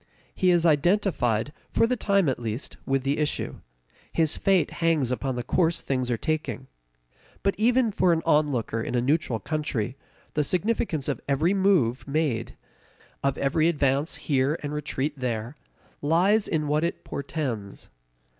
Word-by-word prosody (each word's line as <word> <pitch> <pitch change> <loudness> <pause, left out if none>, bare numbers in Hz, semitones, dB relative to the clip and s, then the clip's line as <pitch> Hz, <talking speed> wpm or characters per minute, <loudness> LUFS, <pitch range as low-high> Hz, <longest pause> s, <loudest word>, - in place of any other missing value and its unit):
He 185 - +2
is 175 -1 +3
identified, 145 - +2 0.2
for - - +3
the 250 +2 +1
time 200 -6 +2
at 130 - 0
least, 115 +3 -4
with 135 -1 +1
the 140 +2 0
issue; 150 -1 -2 0.5
his 160 -2 +1
fate 190 -6 +2
hangs 160 -7 +2
upon 130 0 -2
the 120 - -3
course 165 +5 +1
things 130 -2 -1
are 120 - +1
taking. 140 -4 -2 0.8
But 195 - +2
even 240 +1 +3
for 185 -2 +3
an 165 -1 +1
onlooker 135 -7 +1
in 120 - -3
a - - +3
neutral 135 -2 +1
country, 130 -1 -2 0.4
the 150 - +1
significance 180 - -1
of 145 - -2
every 150 +7 +2
move 185 - +2
made, 140 -6 -1 0.7
of 140 0 +1
every 155 +4 +2
advance 140 -2 +1
here 140 +2 0
and 145 0 -3
retreat 145 0 -2
there, 120 +1 -3 0.5
lies 185 +8 +3
in 155 -2 -1
what 150 +2 +1
it 170 - -2
portends. 130 -9 -5
150 Hz, 155 wpm, -26 LUFS, 130-170 Hz, 0.8 s, is